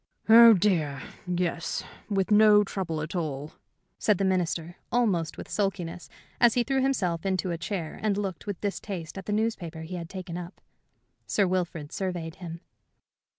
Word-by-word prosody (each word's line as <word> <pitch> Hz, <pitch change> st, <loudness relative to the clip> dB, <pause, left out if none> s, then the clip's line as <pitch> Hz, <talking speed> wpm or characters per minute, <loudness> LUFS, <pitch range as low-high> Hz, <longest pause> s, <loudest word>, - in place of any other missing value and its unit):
"Oh, 230 Hz, 0 st, +10 dB
dear, 165 Hz, -8 st, +1 dB, 0.3 s
yes, 175 Hz, -1 st, -1 dB, 0.3 s
with 195 Hz, -1 st, 0 dB
no 210 Hz, 0 st, +7 dB
trouble 175 Hz, -6 st, -3 dB
at 155 Hz, -, -6 dB
all," 150 Hz, -3 st, -3 dB, 0.5 s
said 210 Hz, -3 st, +3 dB
the 195 Hz, -, +1 dB
Minister, 175 Hz, -2 st, -1 dB
almost 195 Hz, -9 st, +1 dB
with -, -, -7 dB
sulkiness, 180 Hz, -4 st, -2 dB, 0.3 s
as 240 Hz, -2 st, +5 dB
he 245 Hz, -, +3 dB
threw 265 Hz, +2 st, +1 dB
himself 185 Hz, -12 st, 0 dB
into 190 Hz, -1 st, 0 dB
a 170 Hz, -, -2 dB
chair 170 Hz, -4 st, -4 dB
and 210 Hz, -2 st, +1 dB
looked 195 Hz, -1 st, -4 dB
with 200 Hz, -3 st, -3 dB
distaste 195 Hz, -5 st, -4 dB
at 190 Hz, -, -11 dB
the -, -, -1 dB
newspaper 205 Hz, -7 st, -1 dB
he 170 Hz, +3 st, -6 dB
had 170 Hz, -1 st, -7 dB
taken 180 Hz, -2 st, -6 dB
up. 175 Hz, +1 st, -9 dB, 0.7 s
Sir 200 Hz, -, +2 dB
Wilfrid 175 Hz, -5 st, -2 dB
surveyed 175 Hz, -4 st, -4 dB
him. 170 Hz, -2 st, -7 dB
185 Hz, 160 wpm, -27 LUFS, 170-205 Hz, 0.7 s, Oh